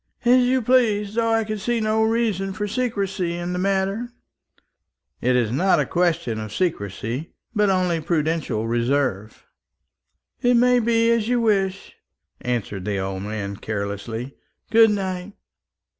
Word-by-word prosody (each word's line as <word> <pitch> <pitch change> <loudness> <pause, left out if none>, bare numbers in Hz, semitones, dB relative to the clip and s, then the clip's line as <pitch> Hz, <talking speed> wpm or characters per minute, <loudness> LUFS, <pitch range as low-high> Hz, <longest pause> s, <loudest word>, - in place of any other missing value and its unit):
"As 250 +1 +6
you 255 0 +2
please, 215 -4 +2
though 230 0 +1
I 225 0 +2
can 215 0 -4
see 240 +3 0
no 215 0 +1
reason 220 -4 0
for 210 +1 -3
secrecy 195 -7 -2
in 175 +1 -3
the 180 - -2
matter." 195 +5 -1 1.1
"It 125 +1 +2
is 120 -3 +1
not 180 +9 +3
a - - +1
question 170 -10 0
of 110 -1 -6
secrecy, 120 - -3 0.2
but 210 -2 +2
only 180 -3 +1
of 160 - -8
prudential 155 -9 0
reserve." 120 -3 -1 1.0
"It 245 0 +4
may 250 +1 +4
be 230 0 +2
as 230 -2 +1
you 245 0 +2
wish," 195 -4 0 0.4
answered 115 -6 -3
the 105 -1 -1
old 95 0 -3
man, 100 -1 -4
carelessly. 110 +5 -4 0.4
"Good 225 0 +7
night." 190 -1 -3
190 Hz, 145 wpm, -23 LUFS, -, 1.1 s, Good